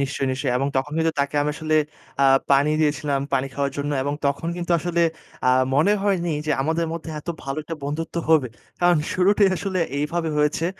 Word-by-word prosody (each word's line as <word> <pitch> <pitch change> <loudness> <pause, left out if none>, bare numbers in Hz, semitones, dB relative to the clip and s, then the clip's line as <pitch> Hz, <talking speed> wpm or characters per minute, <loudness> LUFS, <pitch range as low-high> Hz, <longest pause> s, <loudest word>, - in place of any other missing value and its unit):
নিশ্চয়ই, 135 0 -1
নিশ্চয়ই। 130 -1 -1
এবং 135 +2 0
তখন 140 +3 -1
কিন্তু 160 0 +2
তাকে 140 +1 -2
আমি 150 - 0
আসলে 155 -1 -1 0.5
আ - - +5 0.3
পানি 140 +2 +4
দিয়েছিলাম, 145 -2 +1
পানি 135 0 +1
খাওয়ার 140 -1 -1
জন্য, 145 +1 -2
এবং 145 +2 -1
তখন 140 +4 -1
কিন্তু 175 0 -5
আসলে 170 +1 0 0.5
আ - - +6 0.2
মনে 160 +9 +4
হয়নি 180 -5 +1
যে, - - 0
আমাদের 165 +3 0
মধ্যে 165 -1 -6
এতো 160 - -5
ভালো 135 +2 -3
একটা 165 +2 -6
বন্ধুত্ব 160 +3 -4
হবে। 150 -6 +4 0.3
কারণ 175 -1 +5 0.2
শুরুটাই 195 +2 +4
আসলে 190 -1 -2 0.2
এইভাবে 160 +3 -1
হয়েছে। 150 +2 +1
155 Hz, 190 wpm, -23 LUFS, 140-170 Hz, 0.5 s, আ